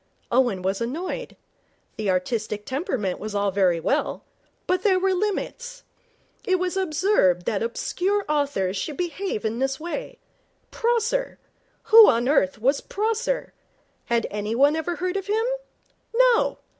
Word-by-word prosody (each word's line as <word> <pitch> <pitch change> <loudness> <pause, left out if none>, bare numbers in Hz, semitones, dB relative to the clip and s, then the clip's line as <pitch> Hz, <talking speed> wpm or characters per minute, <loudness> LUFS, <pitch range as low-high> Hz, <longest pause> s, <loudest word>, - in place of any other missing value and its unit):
Owen 240 -7 +2
was 195 +3 -1
annoyed. 345 - -4 0.6
The 215 -2 -2
artistic 210 +3 -1
temperament 260 - -2
was 215 0 -6
all 200 -1 +1
very 185 -3 +2
well, 165 - -1 0.4
but 365 0 +1
there 390 -4 +3
were 380 +1 +1
limits. 485 +6 -3 0.6
It 375 -1 +2
was 365 0 -2
absurd 310 - +2
that 205 - -1
obscure 375 - -1
authors 280 -11 0
should 295 +8 -4
behave 360 - -3
in 220 +2 -2
this 270 0 -1
way. 470 +9 -5 0.5
Prosser! 480 +2 0 0.5
Who 450 -1 +9
on 235 +2 +1
earth 240 -10 +2
was 270 +5 +2
Prosser? 455 +4 -2 0.5
Had 235 -1 +1
anyone 230 +8 +2
ever 320 +2 -2
heard 365 +2 -2
of 390 0 -5
him? 440 +2 +1 0.7
No! - - +4
305 Hz, 135 wpm, -24 LUFS, -, 0.7 s, Who